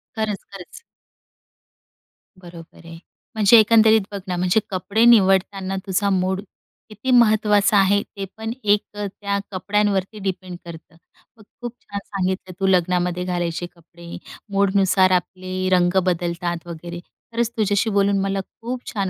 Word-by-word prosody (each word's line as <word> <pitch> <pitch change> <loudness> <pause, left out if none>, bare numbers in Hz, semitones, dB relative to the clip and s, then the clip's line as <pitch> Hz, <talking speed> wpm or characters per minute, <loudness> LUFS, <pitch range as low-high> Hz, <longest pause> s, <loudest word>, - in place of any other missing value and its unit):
खरंच, 215 -3 -3
खरंच. 195 -3 -11 1.6
बरोबर 170 -2 -13
आहे. 165 0 -10 0.4
म्हणजे 215 +1 +6
एकंदरीत 220 0 +5
बघ 200 - -5
ना 180 - -2
म्हणजे 180 +4 +2
कपडे 200 +4 0
निवडताना 195 -3 +3
तुझा 200 +1 0
मूड 190 0 0 0.5
किती 220 +5 -4
महत्त्वाचा 215 -3 +4
आहे, 200 +1 +4
ते 200 -2 -8
पण 225 0 -4
एक 205 0 +3
अ, 205 0 -4
त्या 200 +1 -3
कपड्यांवरती 205 +1 -1
डिपेंड 185 -2 -5
करतं. 165 -1 -11 0.4
मग 215 - -17 0.2
खूप 240 -1 -5
छान 200 0 -6
सांगितलं 190 -1 -3
तू 195 - +1
लग्नामध्ये 180 -1 +1
घालायचे 175 -1 -2
कपडे, 170 0 -12 0.4
मूडनुसार 195 -1 +3
आपले 185 +1 -2
रंग 180 0 +3
बदलतात 175 -1 -2
वगैरे. 170 +1 -7 0.3
खरंच 235 0 0
तुझ्याशी 210 0 +1
बोलून 200 -1 +2
मला 195 0 -1
खूप 240 +6 -7
छान 195 -3 -1
195 Hz, 135 wpm, -21 LUFS, 180-205 Hz, 1.6 s, म्हणजे